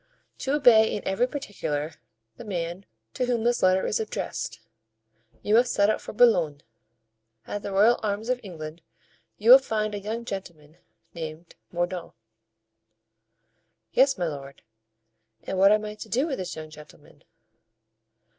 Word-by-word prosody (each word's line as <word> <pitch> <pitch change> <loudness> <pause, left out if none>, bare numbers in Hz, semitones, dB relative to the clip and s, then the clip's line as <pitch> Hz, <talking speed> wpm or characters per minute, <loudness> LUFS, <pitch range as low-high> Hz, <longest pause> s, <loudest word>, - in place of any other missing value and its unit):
"To 270 +2 0
obey 235 -6 +5
in 210 - -5
every 195 +6 +1
particular 165 - -4 0.4
the - - -10
man 175 -2 -4 0.3
to 250 - -1
whom 240 -3 0
this 240 +1 +1
letter 185 0 +3
is - - 0
addressed. 220 - -4 0.8
You 210 - 0
must 240 +2 +4
set 205 +1 +3
out - - -3
for - - -8
Boulogne. 175 -11 +3 0.8
At 205 - -5
the 200 - -5
Royal 210 +5 +4
Arms 210 +1 -2
of 250 0 0
England 165 -4 -8 0.6
you 225 +3 +4
will 260 - +12
find 215 -5 -2
a 205 - -3
young 220 +4 -5
gentleman 170 -7 -8 0.4
named 160 0 -8 0.2
Mordaunt." 175 0 -3 1.8
"Yes, 270 0 +4
my 175 - -1
lord; 140 -3 -7 0.8
and 190 - -3
what 195 +1 +7
am 215 0 +2
I 210 - -5
to 210 - -10
do 260 +5 +1
with 280 -8 -3
this 180 -1 -5
young 155 -1 -8
gentleman?" 150 -1 -16
200 Hz, 150 wpm, -26 LUFS, 170-230 Hz, 1.8 s, will